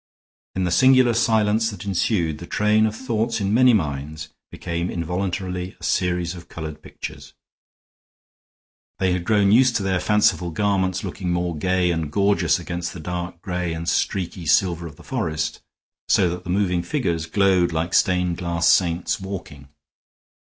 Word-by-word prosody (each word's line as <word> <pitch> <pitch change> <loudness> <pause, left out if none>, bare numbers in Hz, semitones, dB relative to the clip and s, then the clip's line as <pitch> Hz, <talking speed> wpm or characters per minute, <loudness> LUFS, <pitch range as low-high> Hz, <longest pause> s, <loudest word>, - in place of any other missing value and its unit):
In 95 - 0
the 90 - 0
singular 130 +4 +5
silence 110 -1 +2
that 100 -3 -8
ensued, 85 -5 0
the 85 - -9
train 105 +1 +2
of 110 - -4
thought 115 -1 -1
in 100 0 0
many 125 +2 +6
minds 75 - -2 0.2
became 85 0 -4
involuntarily 90 +1 -3
a - - -17
series 90 -1 0
of 85 -2 -12
colored 80 -2 -7
pictures. - - -9 1.6
They 95 -1 +1
had 90 -1 -3
grown 100 0 +3
used 125 +2 +5
to 100 - 0
their 95 -1 0
fanciful 105 -4 +2
garments 95 +1 0
looking 90 -1 -4
more 85 -1 -1
gay 90 +2 +1
and 80 -3 -2
gorgeous 100 +2 +2
against 85 0 -5
the 90 - -8
dark 85 +1 -5
gray 90 -3 -2
and 80 +1 -5
streaky 90 -3 -1
silver 85 +2 +2
of 75 - -12
the - - -16
forest, 75 -1 -3 0.5
so 95 - +4
that 90 +1 -6
the - - -7
moving 90 -2 +1
figures 85 - -2
glowed 95 -2 +2
like 80 +2 -2
stained 90 -3 +2
glass 85 -1 0
saints 85 -1 +2
walking. 85 -8 -8
90 Hz, 160 wpm, -22 LUFS, 85-100 Hz, 1.6 s, many